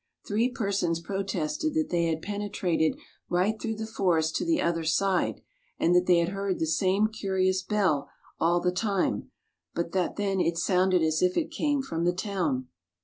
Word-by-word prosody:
Three 225 +4 +1
persons 195 -8 -1
protested 195 - -2
that 315 -1 +1
they 170 -1 +2
had 160 -1 -1
penetrated 200 -6 -1 0.3
right 195 +5 +1
through 225 -1 -2
the 220 +1 -4
forest 175 -7 +1
to 345 - -2
the 330 -2 +2
other 165 -1 0
side, 185 +3 +1 0.3
and 170 - +2
that 180 0 +3
they 180 -1 +6
had 170 0 +2
heard 195 -1 -2
the - - 0
same 185 +6 +2
curious 190 -3 0
bell 190 -10 0 0.3
all 175 +2 +3
the 180 +1 +1
time, 195 0 -1 0.5
but 170 0 -2
that 185 -1 0
then 195 -2 0
it 170 -1 +1
sounded 185 0 +2
as 155 0 +1
if 180 0 +2
it 325 - 0
came 290 -2 0
from 165 -10 -3
the 175 +1 +2
town. 175 -10 -2
185 Hz, 180 wpm, -27 LUFS, 170-205 Hz, 0.5 s, they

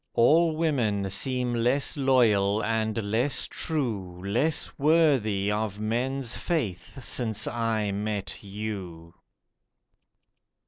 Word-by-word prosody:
All 160 +7 +4
women 115 -12 0
seem 125 +4 0
less 125 +4 +1
loyal 110 -7 +3
and 110 0 -1
less 125 +6 +1
true, 110 - -3
Less 140 +10 0
worthy 135 -10 +3
of 105 -1 -2
men's 120 +3 -1
faith 135 - -3
since 115 -3 0
I 110 -3 -1
met 105 0 -4
you. 95 -5 -6
115 Hz, 95 wpm, -27 LUFS, 100-135 Hz, -, All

